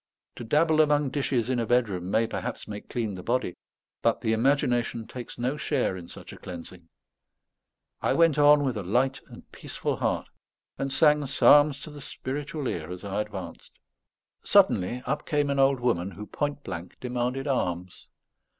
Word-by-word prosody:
To 120 - -6
dabble 155 +6 +3
among 145 -2 +2
dishes 130 -5 0
in 130 -1 0
a 115 - 0
bedroom 105 -7 +1
may 110 +3 +2
perhaps - - -5
make 105 -1 -8
clean 115 -4 -2
the 90 - -7
body; 120 -3 -1 0.5
but - - +1
the 110 - +1
imagination 120 -2 +1
takes 120 +1 -9
no 125 +4 -1
share 140 -10 0
in 90 -2 -9
such - - -10
a - - -12
cleansing. 85 -1 -10 1.1
I - - +2
went 165 -3 +4
on 145 0 +6
with 130 -5 -1
a - - -2
light 125 +8 0
and - - -14
peaceful - - -4
heart, - - -1 0.5
and 135 0 -2
sang 150 0 +4
psalms 145 +1 +5
to 155 - -9
the 145 -1 -10
spiritual 145 +3 -5
ear 80 -6 -4
as 90 +2 -7
I 100 +1 -1
advanced. - - -8 0.7
Suddenly 120 +8 +3
up - - -2
came 145 -2 +1
an 140 - 0
old 135 -1 +4
woman, 105 -7 0
who 105 +2 -8
point 145 +4 -3
blank 85 +1 -7
demanded 125 +2 -2
alms. 90 -10 -2
125 Hz, 170 wpm, -27 LUFS, 105-145 Hz, 1.1 s, on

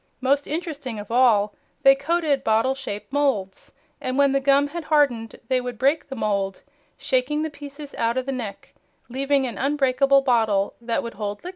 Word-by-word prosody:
Most 275 +2 +1
interesting 295 -7 -4
of 205 +1 -8
all, 220 -4 +4 0.3
they 270 - +8
coated 295 0 0
bottle 225 +4 +2
shaped 210 -4 -7
moulds, 240 -10 -1 0.3
and 255 +1 -2
when 280 -1 +4
the 275 - +2
gum 275 +1 +3
had 335 +1 -6
hardened 265 -8 +1
they 255 -1 +1
would 245 -2 -6
break 280 +6 +1
the 270 - -5
mould, 200 -4 -2 0.3
shaking 265 +4 0
the 315 - -3
pieces 290 0 -10
out 230 +2 0
of 260 - -1
the 275 - -2
neck, 235 -6 -6 0.4
leaving 275 +2 +1
an 235 -5 -5
unbreakable 275 -1 +3
bottle 220 -6 +2
that 230 -1 -1
would 235 - -6
hold 205 +2 -5
liquids. 355 - -5
265 Hz, 180 wpm, -23 LUFS, 230-280 Hz, 0.4 s, they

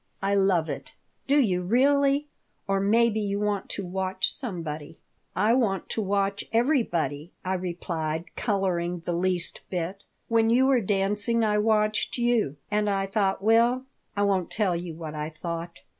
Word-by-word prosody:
"I 200 +1 +1
love 190 -5 +3
it." - - -6 0.3
"Do 285 +2 +4
you 185 -9 +2
really? 280 +7 +3 0.4
Or 195 0 +1
maybe 220 +2 +3
you 200 -1 -1
want 205 -2 -1
to 200 - -4
watch 185 +1 -1
somebody?" 165 - -5 0.4
"I 215 +4 +3
want 220 -7 0
to 225 - -1
watch 200 0 0
everybody," 175 - 0
I 185 - 0
replied, 170 -3 -3
coloring 180 -5 -1
the 175 - -1
least 180 0 -1
bit. 185 +2 -3 0.2
"When 225 -1 +3
you 250 +3 +4
were 265 -3 +4
dancing 205 +3 +1
I 210 -1 +2
watched 215 +1 +1
you, 235 - +1
and 210 0 +1
I 195 -1 0
thought 195 -1 0
well, 235 +4 +3 0.3
I 205 - +2
won't 195 -3 +1
tell 200 -5 0
you 170 -1 -5
what 160 -2 -7
I 150 0 -3
thought." 170 +1 -6
195 Hz, 160 wpm, -26 LUFS, 175-225 Hz, 0.4 s, Do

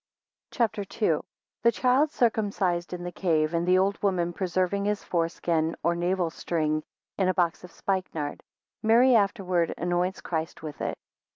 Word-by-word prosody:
CHAP. 230 -4 0
II. 200 -1 0
1 155 - 0 0.4
The 235 - +5
child 255 +6 +3
circumcised 200 - 0
in 180 -1 -5
the 175 - -4
cave, 160 -4 +1
2 170 - 0
and 170 +1 -1
the 185 0 +5
old 195 +2 +1
woman 180 -4 +1
preserving 185 +2 0
his 210 0 -1
foreskin 165 -1 0
or 170 - +3
navel 175 0 0
string 155 -2 -1 0.4
in 190 - +3
a 185 - +1
box 175 -1 +1
of 180 - -11
spikenard, 180 -6 -3 0.4
Mary 240 +4 +5
afterwards 190 -5 +1
anoints 175 +2 0
Christ 160 -1 -4
with 150 -2 -7
it. - - -2
180 Hz, 165 wpm, -27 LUFS, 170-200 Hz, 0.4 s, The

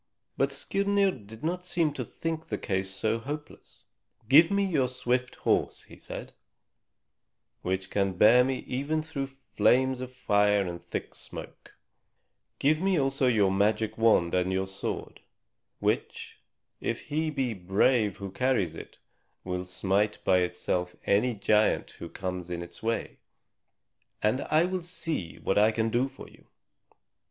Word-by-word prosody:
But 135 +1 +1
Skirnir 200 +7 +1
did 110 - -12
not 180 +3 -1
seem 170 -4 0
to - - -3
think 160 -1 -4
the - - -2
case 95 -2 -1
so 110 +4 0
hopeless. 145 +5 -8 0.4
"Give 155 +6 +7
me 200 0 +2
but 190 - -3
your 135 -4 +3
swift 125 0 -1
horse," - - 0
he - - -14
said, - - -8 1.3
"which 95 +1 -2
can 100 -2 +1
bear 110 +7 +6
me 130 0 -2
even 145 +5 -1
through 145 -4 -4
flames 130 0 +1
of 130 0 -6
fire 105 -5 +2
and 85 -1 -6
thick - - -5
smoke; - - -8 0.8
give 155 +3 +2
me 190 -3 +2
also 135 -1 +1
your 105 -6 +3
magic 105 +2 +1
wand 110 -7 +3
and 90 0 +1
your 95 0 0
sword, 95 0 -5 0.6
which - - -2 0.4
if - - -2
he 155 +2 -1
be 135 -5 -1
brave 100 +3 +2
who 100 -1 -6
carries 120 -8 +1
it, - - -10 0.5
will 90 0 -3
smite 95 +3 0
by 95 -1 +4
itself 90 0 -1
any 115 +4 +2
giant 105 +1 +2
who - - -9
comes 90 -2 -5
in 85 -1 -3
its 85 - -11
way, 115 +1 -2 1.0
and 110 +6 +2
I 155 +2 +4
will 185 0 -2
see 165 - -4
what 95 - +1
I 105 +1 +6
can 110 0 0
do 125 +3 +2
for - - -12
you." - - -20
115 Hz, 150 wpm, -28 LUFS, 95-140 Hz, 1.3 s, Give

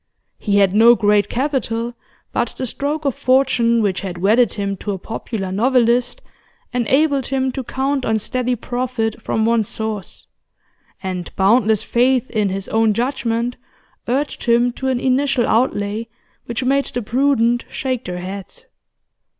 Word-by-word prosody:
He 200 -2 +1
had 195 -2 +4
no 230 +3 +7
great 210 -2 +2
capital, 240 -3 -1 0.4
but - - -1
the 260 - -2
stroke 290 +5 -3
of 275 - +2
fortune 245 -3 +2
which 195 -2 0
had 185 -3 -5
wedded 215 +6 +3
him 200 -2 -2
to 205 +2 -4
a - - -4
popular 195 -1 -5
novelist 245 - +2 0.5
enabled 270 +3 +2
him 265 -1 0
to 260 +1 -4
count 270 +2 -1
on 220 -2 +1
steady 250 +3 -1
profit 240 -2 -3
from 220 0 0
one 230 -1 +3
source, 215 -1 -5 0.8
and 185 -2 -4
boundless 215 +2 +3
faith 255 +2 +1
in 210 -3 +1
his 195 0 -4
own 220 -1 +2
judgment 240 -1 -1 0.5
urged 275 +4 -2
him 240 0 +3
to 265 +2 -5
an 260 -2 +1
initial 260 -1 +1
outlay 220 -2 0 0.4
which 235 +2 -3
made 275 +2 +2
the 245 - -4
prudent 240 0 +1
shake 255 -2 -3
their 180 0 -4
heads. 190 +1 -8
235 Hz, 150 wpm, -19 LUFS, 215-260 Hz, 0.8 s, no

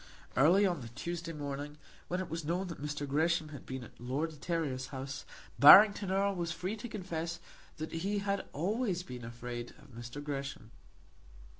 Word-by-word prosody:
Early 175 +9 +6
on 175 -6 0
the 120 - -7
Tuesday 170 +7 -5
morning, 145 -1 -5 0.3
when 180 - -1
it 185 - -3
was 165 0 -4
known 175 +5 -1
that 165 - -7
Mr. 145 0 -3
Gresham 160 +2 +1
had 145 -3 -10
been 130 -1 -5
at - - -14
Lord 135 +7 -2
de - - -12
Terrier's 145 -6 -2
house, 135 0 -6 0.3
Barrington 200 +6 +9
Erle 195 +1 +2
was 170 -2 -2
free 185 +4 -3
to 235 +3 -7
confess 170 -5 -4 0.4
that 155 0 -5
he 195 +5 -1
had 200 -1 -1
always 190 - -1
been 125 -6 -8
afraid 120 +1 -6
of - - -17
Mr. 120 +3 -8
Gresham. 140 -6 -5
160 Hz, 175 wpm, -33 LUFS, 135-180 Hz, 0.4 s, Barrington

